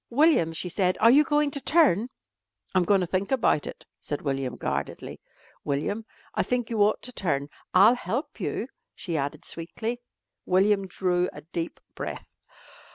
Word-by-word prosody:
"William," 275 - +4
she 165 +2 -4
said, 185 +1 +1
"are 230 +2 +7
you 290 +4 +7
going 295 0 +2
to 280 - -2
turn?" 260 - +4 0.6
"I'm 185 -2 +3
goin' 195 +1 +4
to - - +1
think 185 +5 -2
about 235 - +2
it," - - -9
said 145 - -4
William 135 -3 -2
guardedly. - - -4 0.4
"William, 205 +10 -2 0.3
I - - +1
think 245 -2 -1
you 220 -2 +1
ought 210 +1 +3
to 250 - -4
turn. 145 -9 -1 0.3
I'll 200 +6 +8
help 255 +4 -4
you," - - -2 0.3
she 170 -4 -4
added 140 -1 -3
sweetly. 220 +8 -4 0.4
William 195 +1 +2
drew 180 -1 0
a - - -9
deep 165 +1 -5
breath. - - -7
195 Hz, 160 wpm, -26 LUFS, 170-245 Hz, 0.6 s, I'll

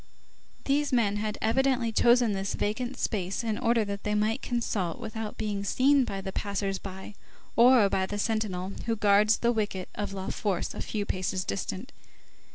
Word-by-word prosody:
These 290 +1 +1
men 215 -5 +2
had 210 0 -2
evidently 250 +1 +2
chosen 240 0 +4
this 195 0 -2
vacant 245 +5 -2
space 195 -1 -2
in 220 -2 -1
order 230 -2 +2
that 200 0 -5
they 210 0 0
might 215 +2 +1
consult 215 -7 -2
without 220 -2 -5
being 205 -2 -2
seen 265 +6 +3
by 195 -3 -4
the 190 0 -5
passers 200 -1 -2
by 190 +1 -8 0.4
or 240 -2 +6
by 190 -1 0
the 205 - -4
sentinel 205 -4 -1
who 230 - +1
guards 210 +1 +4
the 235 - +2
wicket 205 -5 -2
of 205 -1 -4
La 190 -1 -5
Force 195 -5 -2
a - - -6
few 210 -2 -3
paces 185 -1 -2
distant. 195 +7 -4
210 Hz, 170 wpm, -28 LUFS, 195-235 Hz, 0.4 s, or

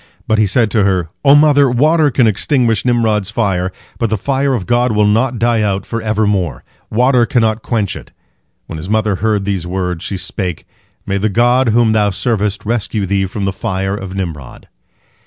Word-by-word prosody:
But 110 0 +2
he 105 - +3
said 110 +2 +1
to 110 -3 +2
her: 95 -4 0
"O 140 0 +6
mother, 145 -2 +5
water 150 +5 +3
can 125 -2 +2
extinguish 115 +1 +1
Nimrod's 110 -5 +1
fire, 95 -5 -1 0.3
but 115 - 0
the 110 - 0
fire 135 +4 0
of 100 -7 -4
God 120 0 +1
will 105 0 +2
not 115 +4 +1
die 115 0 +1
out 100 -2 -1
for 115 0 -4
evermore. 100 - -1 0.3
Water 125 +1 +2
cannot 110 -2 +1
quench 110 -6 -2
it." - - -11 0.5
When 80 - -7
his 85 +5 -7
mother 110 -2 +1
heard 105 -1 0
these 95 -4 -2
words, 90 -2 -3
she 100 - -3
spake, 90 -2 -4 0.4
"May 100 0 -1
the 110 +2 0
God 120 +4 +2
whom 115 0 +3
thou 105 -1 +2
servest 105 0 -2
rescue 110 -2 -2
thee 95 0 0
from 100 +1 -4
the 95 - -1
fire 95 -2 -3
of 95 -2 -7
Nimrod!" 80 -9 -6
110 Hz, 190 wpm, -15 LUFS, 95-120 Hz, 0.5 s, O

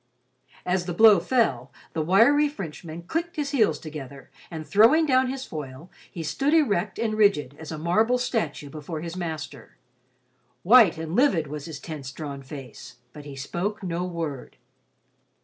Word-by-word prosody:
As 180 0 0
the 175 - -3
blow 215 -1 +7
fell, 165 - 0 0.2
the 160 - -1
wiry 235 - +4
Frenchman 170 - -8
clicked 335 - -3
his 290 -3 -2
heels 215 - +2
together, 140 -4 -9 0.2
and 160 -2 -7
throwing 230 - +5
down 260 -2 +3
his 265 0 -5
foil, 150 +1 -8 0.2
he 165 - -6
stood 280 - 0
erect 210 - +1
and 225 -1 -1
rigid 200 -11 +2
as 160 0 -8
a 160 - -5
marble 215 +10 +2
statue 165 - -3
before 155 +1 -6
his 170 +1 -6
master. 160 -7 -6 0.9
White 215 -4 +6
and 160 +1 -5
livid 225 - +3
was 150 0 -7
his 155 -4 -7
tense 145 -4 -7
drawn 140 -1 -7
face, 130 -2 -10 0.2
but 150 -1 -11
he 140 -2 -9
spoke 185 +10 -4
no 175 -1 -2
word. 165 -7 -5
170 Hz, 160 wpm, -25 LUFS, 150-220 Hz, 0.9 s, blow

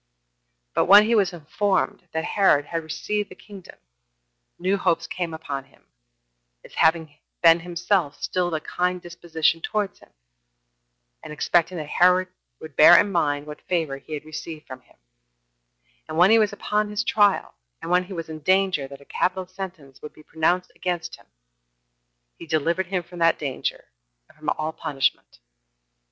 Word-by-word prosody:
But - - +2
when 205 +3 +8
he 230 - +1
was 200 -5 +3
informed 180 +3 -1
that 160 0 -2
Herod 190 -8 +3
had 165 +2 -3
received 205 +6 -3
the - - -12
kingdom, 195 -4 -13 0.8
new 185 +3 +1
hopes 170 -4 0
came 170 0 -4
upon 145 -4 -5
him, 135 - -27 0.8
as - - -15
having 160 -2 +1 0.2
been 165 0 +7
himself 175 -2 -1
still 180 -1 -1
of 175 - -4
a 160 - 0
kind 180 +2 -1
disposition 165 -2 -1
towards 205 +1 -2
him, - - -20 1.1
and - - -10
expecting 170 +3 +1
that 155 - -4
Herod 180 +3 +3 0.3
would 155 -3 -11
bear 155 - +9
in 205 - +1
mind 145 -5 0
what 150 0 -9
favor 160 -6 -2
he 155 +2 -7
had 150 - -8
received 155 0 -8
from 130 - -10
him; - - -27 1.1
and 155 - -4
when 180 +4 +6
he 225 - +6
was 215 -2 +2
upon 210 +1 -1
his 210 0 -2
trial, 205 -2 +2 0.3
and 170 - -6
when 180 0 +3
he 190 - -9
was 165 -2 -5
in 160 -1 -7
danger 185 -3 +1
that 140 0 -12
a - - -16
capital 185 +4 -1
sentence 180 -7 -9
would 150 - -9
be 155 - -17
pronounced 175 +4 0
against 175 -2 -4
him, - - -23 1.1
he 170 - -10
delivered 170 +4 0
him 180 -1 -2
from 175 +1 -12
that 165 0 +4
danger, 140 -4 -4 0.4
and - - -23
from 155 0 -4
all 155 +1 -3
punishment. 135 -5 -2
170 Hz, 170 wpm, -24 LUFS, 155-185 Hz, 1.1 s, bear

